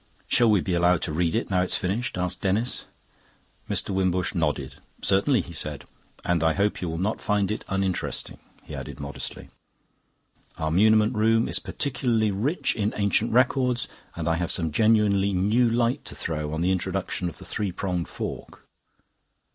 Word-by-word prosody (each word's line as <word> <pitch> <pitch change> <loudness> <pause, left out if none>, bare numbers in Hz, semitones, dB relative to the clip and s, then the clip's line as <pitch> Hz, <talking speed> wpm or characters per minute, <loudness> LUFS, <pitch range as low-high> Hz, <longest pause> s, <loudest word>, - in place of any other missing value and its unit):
"Shall 120 -2 +4
we 105 -4 +4
be 90 - -2
allowed 90 0 +3
to 80 - -3
read 85 +2 +1
it 115 - -1
now 90 -1 +3
it's 90 - +2
finished?" 100 +4 -2
asked 90 -1 -2
Denis. 105 +6 0 0.8
Mr. - - -1
Wimbush 95 -1 0
nodded. 75 -6 -1 0.3
"Certainly," 100 +5 +3
he 85 - -10
said. 75 -3 -5 0.4
"And 85 -2 +1
I 80 0 +4
hope 100 +3 0
you 90 - -2
will 80 - -3
not 100 +5 -1
find 105 -1 +1
it 110 - -3
uninteresting," 95 -2 -2 0.2
he - - -10
added - - -7
modestly. 70 0 -6 1.1
"Our 80 0 -1
muniment 110 +5 +4
room 115 +1 +3
is - - -1
particularly 120 -5 0
rich 125 - 0
in 105 -1 -1
ancient 105 +2 +2
records, 125 0 +2 0.3
and 85 -2 -3
I 80 0 +2
have 90 0 -2
some 80 -4 -1
genuinely 105 0 +3
new 105 +6 +3
light 120 +1 +1
to - - -5
throw 75 -2 -3
on 80 +1 -2
the 90 +2 +2
introduction 90 -1 -1
of - - -12
the - - -11
three 105 -3 -2
pronged 90 -2 -2
fork." - - -7
95 Hz, 170 wpm, -26 LUFS, 85-110 Hz, 1.1 s, Shall